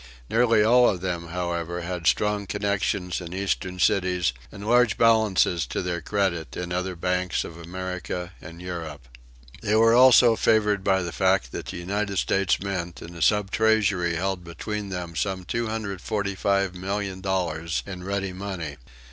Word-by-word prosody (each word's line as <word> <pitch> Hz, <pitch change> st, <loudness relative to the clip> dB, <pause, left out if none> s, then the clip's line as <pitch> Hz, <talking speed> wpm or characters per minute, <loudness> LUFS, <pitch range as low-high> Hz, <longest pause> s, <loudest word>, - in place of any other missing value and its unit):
Nearly 115 Hz, -2 st, +4 dB
all 120 Hz, +2 st, +6 dB
of 90 Hz, -3 st, -2 dB
them, 85 Hz, -2 st, -3 dB
however, 85 Hz, 0 st, -3 dB
had 85 Hz, -2 st, -3 dB
strong 105 Hz, +3 st, +1 dB
connections 100 Hz, -3 st, -1 dB
in 85 Hz, 0 st, -7 dB
Eastern 95 Hz, -1 st, -2 dB
cities 90 Hz, -4 st, +2 dB, 0.2 s
and 100 Hz, 0 st, -9 dB
large 120 Hz, -1 st, +4 dB
balances 105 Hz, -, +3 dB
to -, -, -3 dB
their 85 Hz, -1 st, -2 dB
credit 90 Hz, -4 st, -1 dB
in 90 Hz, 0 st, -4 dB
other 90 Hz, +1 st, -2 dB
banks 90 Hz, +1 st, -1 dB
of 85 Hz, -, -9 dB
America 90 Hz, +1 st, -5 dB
and 85 Hz, +2 st, -10 dB
Europe. 80 Hz, -7 st, -6 dB, 0.5 s
They 105 Hz, -1 st, +1 dB
were 115 Hz, +1 st, +5 dB
also 125 Hz, -1 st, +7 dB
favored 105 Hz, -3 st, +2 dB
by 95 Hz, -1 st, +2 dB
the 85 Hz, -, -4 dB
fact 95 Hz, -11 st, +1 dB
that -, -, -6 dB
the -, -, -5 dB
United 100 Hz, +3 st, -2 dB
States 95 Hz, +1 st, +1 dB
Mint 90 Hz, -3 st, -4 dB
and 85 Hz, -, -10 dB
the 85 Hz, -, -8 dB
Sub 105 Hz, +3 st, +2 dB
Treasury 100 Hz, -6 st, +2 dB
held 95 Hz, +1 st, -2 dB
between 100 Hz, +4 st, -5 dB
them 90 Hz, -3 st, -5 dB
some 95 Hz, 0 st, -2 dB
$245,000,000 100 Hz, -5 st, -2 dB
in 90 Hz, -2 st, -7 dB
ready 95 Hz, 0 st, -2 dB
money. 90 Hz, -6 st, -5 dB
95 Hz, 150 wpm, -25 LUFS, 85-100 Hz, 0.5 s, also